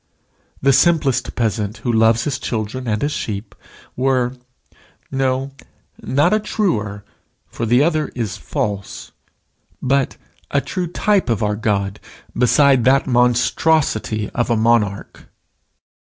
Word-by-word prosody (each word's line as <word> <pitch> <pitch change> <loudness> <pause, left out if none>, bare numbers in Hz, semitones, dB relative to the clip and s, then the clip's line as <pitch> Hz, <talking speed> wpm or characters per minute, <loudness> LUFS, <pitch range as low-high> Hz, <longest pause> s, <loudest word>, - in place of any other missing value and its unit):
The 135 0 +5
simplest 145 -2 +2
peasant 110 -2 -1
who 120 - +1
loves 115 +1 +3
his 140 -3 -2
children 115 +3 -4
and 105 +1 -1
his 145 - 0
sheep 105 -5 -5 0.4
were 130 -1 +1 0.8
no, 135 0 -1 0.5
not 140 +9 +2
a 215 - +3
truer, 110 - -2 0.4
for 115 - -5
the 120 +5 +4
other 155 -1 +1
is 115 -5 -3
false, 100 -2 -4 0.7
but 135 +1 0 0.3
a 140 - +2
true 180 +6 -3
type 200 - +1
of 110 -3 0
our 105 0 0
God 100 -2 -1 0.4
beside 135 0 +4
that 135 +2 +4
monstrosity 125 -2 +1
of 120 -1 -1
a 115 - +2
monarch. 110 -3 0
125 Hz, 125 wpm, -19 LUFS, 110-140 Hz, 0.8 s, The